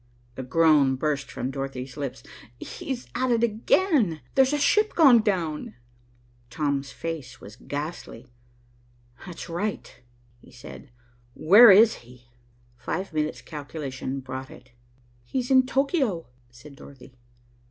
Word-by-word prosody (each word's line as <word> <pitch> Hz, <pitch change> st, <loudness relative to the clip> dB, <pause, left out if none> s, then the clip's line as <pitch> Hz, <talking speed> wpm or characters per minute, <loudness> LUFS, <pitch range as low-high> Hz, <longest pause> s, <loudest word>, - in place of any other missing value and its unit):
A -, -, -5 dB
groan 140 Hz, 0 st, +3 dB
burst 140 Hz, 0 st, -2 dB
from 130 Hz, +2 st, -4 dB
Dorothy's 135 Hz, -1 st, -6 dB
lips. 140 Hz, -3 st, -6 dB, 0.4 s
"He's 260 Hz, -3 st, -6 dB
at 255 Hz, +2 st, -1 dB
it 235 Hz, -1 st, +1 dB
again. 230 Hz, -, +1 dB
There's 265 Hz, 0 st, +3 dB
a 295 Hz, -, 0 dB
ship 425 Hz, +9 st, +2 dB
gone 270 Hz, -8 st, +6 dB
down." 170 Hz, -, -2 dB, 0.7 s
Tom's 140 Hz, -1 st, -2 dB
face 130 Hz, -4 st, -7 dB
was 105 Hz, +2 st, -12 dB
ghastly. 145 Hz, -3 st, -7 dB, 1.0 s
"That's 175 Hz, -2 st, -8 dB
right," 195 Hz, +5 st, -4 dB, 0.4 s
he -, -, -19 dB
said. 130 Hz, +3 st, -12 dB, 0.5 s
"Where 210 Hz, +9 st, +7 dB
is 215 Hz, +3 st, +6 dB
he?" 120 Hz, 0 st, -19 dB, 0.5 s
Five 185 Hz, +6 st, -5 dB
minute's 155 Hz, 0 st, -3 dB
calculation 140 Hz, -3 st, -6 dB
brought 130 Hz, 0 st, -7 dB
it. 125 Hz, 0 st, -16 dB, 0.5 s
"He's 250 Hz, -, -4 dB
in 260 Hz, -1 st, +5 dB
Tokio," 265 Hz, -, 0 dB, 0.2 s
said 135 Hz, +4 st, -15 dB
Dorothy. 135 Hz, -2 st, -15 dB
155 Hz, 120 wpm, -25 LUFS, -, 1.0 s, Where